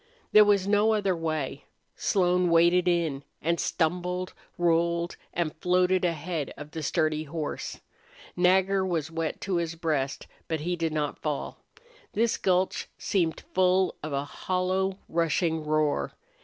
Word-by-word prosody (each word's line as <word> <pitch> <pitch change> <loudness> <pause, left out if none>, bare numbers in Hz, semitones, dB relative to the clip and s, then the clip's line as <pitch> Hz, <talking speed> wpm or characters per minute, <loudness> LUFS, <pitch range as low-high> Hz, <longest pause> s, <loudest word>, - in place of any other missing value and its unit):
There 215 - +9
was 200 -2 +3
no 210 +2 +4
other 200 -4 +1
way. 155 -4 -3 0.3
Slone 180 -2 +2
waded 170 +2 +4
in, 165 -6 +1 0.2
and 170 +2 0
stumbled, 180 +2 -1 0.2
rolled, 170 0 +1 0.2
and 170 -3 -2
floated 180 +2 +2
ahead 165 -2 -2
of 150 +1 -9
the 160 - -5
sturdy 155 +1 0
horse. 155 0 -5 0.5
Nagger 190 +2 +3
was 165 -4 -2
wet 165 -1 -3
to 190 -3 -1
his 165 -1 -2
breast, 150 -5 -1 0.2
but 160 -2 -2
he 175 +3 -1
did 165 -2 -1
not 150 -2 -2
fall. 150 -2 -3 0.5
This 230 +1 +1
gulch 185 0 +1
seemed 170 -5 0
full 185 0 +3
of 155 - -5
a 140 0 -1
hollow 185 +4 -1
rushing 165 0 0
roar. 155 -1 0
170 Hz, 140 wpm, -27 LUFS, 155-185 Hz, 0.5 s, There